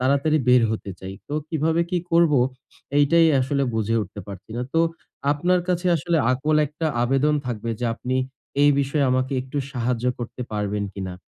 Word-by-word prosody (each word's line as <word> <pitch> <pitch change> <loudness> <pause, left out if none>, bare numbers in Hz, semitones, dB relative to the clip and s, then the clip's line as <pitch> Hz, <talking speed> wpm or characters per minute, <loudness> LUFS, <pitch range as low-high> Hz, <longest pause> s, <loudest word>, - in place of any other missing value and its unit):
তাড়াতাড়ি 140 +4 +2
বের 125 -1 +6
হতে 105 -2 -4
চাই। 95 +1 -7
তো 145 - -4
কিভাবে 160 +1 +1
কি 180 - +1
করবো? 165 -5 +5 0.6
এইটাই 165 +3 +5
আসলে 140 +2 0
বুঝে 110 0 0
উঠতে 100 +1 -8
পারছি 100 0 -10
না। 125 - -1
তো 165 - +4 0.5
আপনার 175 +5 +1
কাছে 180 0 0
আসলে 170 +2 0 0.2
আকুল 150 +4 +1
একটা 155 +3 -4 0.2
আবেদন 135 +4 +2
থাকবে 115 -1 -3
যে - - -1
আপনি 130 +2 -2 0.5
এই 145 - +7
বিষয়ে 140 +1 +1
আমাকে 130 +1 0
একটু 130 +2 -5
সাহায্য 125 -2 -1
করতে 120 +1 -6
পারবেন 105 -1 -1
কিনা? 95 -2 -5
135 Hz, 170 wpm, -23 LUFS, 115-155 Hz, 0.6 s, এই